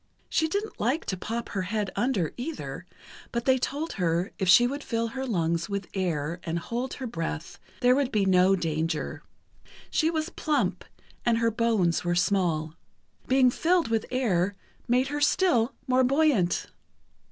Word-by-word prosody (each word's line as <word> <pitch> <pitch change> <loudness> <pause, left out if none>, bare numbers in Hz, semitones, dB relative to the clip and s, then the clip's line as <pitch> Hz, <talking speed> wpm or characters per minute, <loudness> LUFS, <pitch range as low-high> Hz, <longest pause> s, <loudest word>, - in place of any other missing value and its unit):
She 320 - +2
didn't 410 +6 -3
like 255 +9 0
to 190 - -2
pop 230 +6 -4
her 195 - -2
head 205 +1 -2
under, 220 - 0
either, 290 +6 -6 0.4
but 235 0 -2
they 260 -1 +4
told 295 +6 -3
her 170 +3 +1
if 190 -3 0
she 240 +7 +8
would 280 +4 -3
fill 230 -1 -1
her 265 +2 -4
lungs 170 -5 0
with 200 -1 -3
air 170 -3 -2
and 165 0 -2
hold 240 +9 -3
her 265 - -6
breath, 165 -6 -5 0.2
there 250 0 +5
would 275 -1 +1
be 205 -2 +2
no 185 0 +5
danger. 160 -2 -2 0.7
She 315 - +2
was 320 0 -1
plump, 305 -2 -1 0.4
and 235 -1 +2
her 230 0 +2
bones 220 -7 +1
were 175 0 0
small. 175 -4 +1 0.5
Being 255 -1 +4
filled 345 +1 +2
with 225 -1 0
air 205 -7 +1 0.3
made 255 +3 +2
her 295 +1 -3
still 280 -7 +3
more 260 0 +3
buoyant. 265 - +2
230 Hz, 165 wpm, -27 LUFS, 180-265 Hz, 0.7 s, she